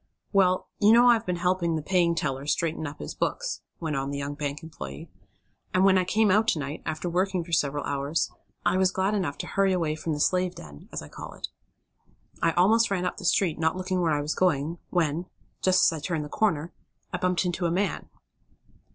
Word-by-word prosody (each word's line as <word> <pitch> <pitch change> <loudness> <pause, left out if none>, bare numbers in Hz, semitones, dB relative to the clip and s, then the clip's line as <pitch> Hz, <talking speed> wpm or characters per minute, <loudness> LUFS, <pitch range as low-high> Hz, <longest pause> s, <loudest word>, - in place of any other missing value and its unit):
"Well, 185 -2 +3
you 210 0 +6
know 240 +1 +7
I've 230 -3 +3
been 180 - 0
helping 175 -1 +1
the 155 - -3
paying 175 -1 +2
teller 135 -3 -2
straighten 160 0 0
up 145 +1 -8
his - - -6
books," - - -2 0.2
went 160 -3 -2
on 135 0 -2
the 140 - -3
young 140 +1 -3
bank 145 0 -4
employee, 70 - -8 0.6
"and 185 +1 +5
when 190 -1 +5
I 185 - 0
came 210 +2 +3
out 215 +3 +3
to 165 - +2
night, 145 +2 -5
after 155 +2 -3
working 185 +1 0
for 170 - -12
several 145 -2 +1
hours, 140 +3 -1 0.3
I 185 - +3
was 190 0 +4
glad 190 +2 0
enough 180 -9 -1
to - - -4
hurry 195 -1 +2
away 165 -4 0
from 155 +1 -3
the 150 - -3
'slave 180 +3 +1
den,' 75 -2 -12
as - - -5
I - - -10
call - - -9
it. - - -6 0.9
I 165 - +4
almost 220 +7 +4
ran 185 -2 0
up - - -2
the 190 - -7
street, 170 -3 +2
not 160 +2 +1
looking 185 0 -1
where 165 -3 +2
I 145 - 0
was 150 +2 -1
going, 165 -2 +1
when, 170 0 0 0.3
just 185 0 +4
as 165 - +4
I 155 - -6
turned 155 0 -2
the - - -9
corner, 165 -6 0 0.4
I 180 - -1
bumped 180 0 +1
into 175 0 0
a - - -1
man." 195 +4 -1
175 Hz, 220 wpm, -27 LUFS, 150-185 Hz, 0.9 s, know